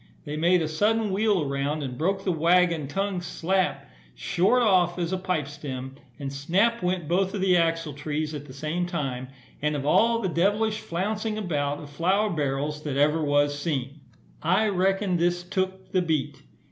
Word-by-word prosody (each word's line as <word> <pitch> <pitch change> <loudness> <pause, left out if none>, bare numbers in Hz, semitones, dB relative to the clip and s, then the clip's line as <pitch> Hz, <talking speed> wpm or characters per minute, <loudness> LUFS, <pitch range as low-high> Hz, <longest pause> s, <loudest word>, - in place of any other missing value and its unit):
They 150 0 -4
made 170 +2 +3
a - - -1
sudden 210 +6 +1
wheel 200 -3 +2
around, 140 +2 -2
and 130 -2 -4
broke 190 +7 -1
the 190 - +1
waggon 170 -2 +3
tongue 195 +4 -2
slap, 185 +2 -1 0.3
short 200 +7 +2
off, 180 -5 +3
as 175 0 -2
a - - +1
pipe 180 -6 -1
stem; 135 -3 -6 0.2
and 140 -2 -5
snap 190 +12 +1
went 180 -3 -1
both 190 +4 +1
of 195 - -2
the 190 -1 +4
axletrees 155 -2 -1
at 145 -1 -6
the - - -10
same 155 +6 -2
time, 135 -7 -3 0.3
and 150 +1 0
of 140 -1 -3
all 230 +9 +3
devlish 205 +5 +1
flouncing 215 +4 -2
about 145 -8 -1
of 145 -1 -10
flour 190 +7 +1
barrels 150 0 -2
that 145 -3 -3
ever 150 +2 +3
was 145 0 +2
seen, 145 -2 -3 0.4
I 185 +7 +2
reckon 195 0 +1
this 175 +1 +1
took 190 +1 -3
the 185 - +2
beat. 160 -6 -1
170 Hz, 170 wpm, -26 LUFS, 145-190 Hz, 0.4 s, the